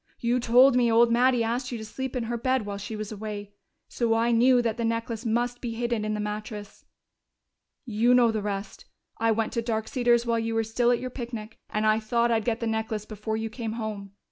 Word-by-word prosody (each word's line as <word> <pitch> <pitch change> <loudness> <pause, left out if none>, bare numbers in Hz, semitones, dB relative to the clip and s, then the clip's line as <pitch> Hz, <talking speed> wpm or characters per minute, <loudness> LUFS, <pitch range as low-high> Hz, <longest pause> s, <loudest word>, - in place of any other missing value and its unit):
You 240 +1 +1
told 245 +2 +5
me 240 -2 +3
old 230 +1 +5
Mattie 245 0 +3
asked 245 +3 -2
you 240 - -3
to 220 - -7
sleep 265 +4 -5
in 250 - -1
her 235 +1 -3
bed 255 -1 0
while 200 -1 -5
she 205 +2 -6
was 215 0 -5
away. 205 -1 -6 0.3
So 230 -2 0
I 230 +1 +2
knew 245 +2 +5
that 230 -2 0
the 235 - -2
necklace 230 0 -2
must 240 +2 -1
be 230 -2 -4
hidden 235 -2 -1
in 215 0 -1
the - - -4
mattress.... 210 0 -6 1.0
"You 235 +1 +3
know 240 -2 +5
the 220 -1 -2
rest. 200 -1 -5 0.3
I 225 +1 +2
went 220 0 -1
to 235 - 0
Dark 220 -1 -2
Cedars 240 -2 +2
while 230 -1 +1
you 225 0 -2
were 225 - +2
still 235 +2 +1
at 245 - +4
your 255 0 -5
picnic, 235 -3 -7
and 215 0 -1
I 215 0 +4
thought 235 +2 +1
I'd 225 -2 +1
get 230 -1 -1
the - - -1
necklace 220 -1 -2
before 215 +1 -4
you 220 0 -4
came 225 -2 -4
home. 210 -3 -5
230 Hz, 230 wpm, -26 LUFS, 215-240 Hz, 1.0 s, told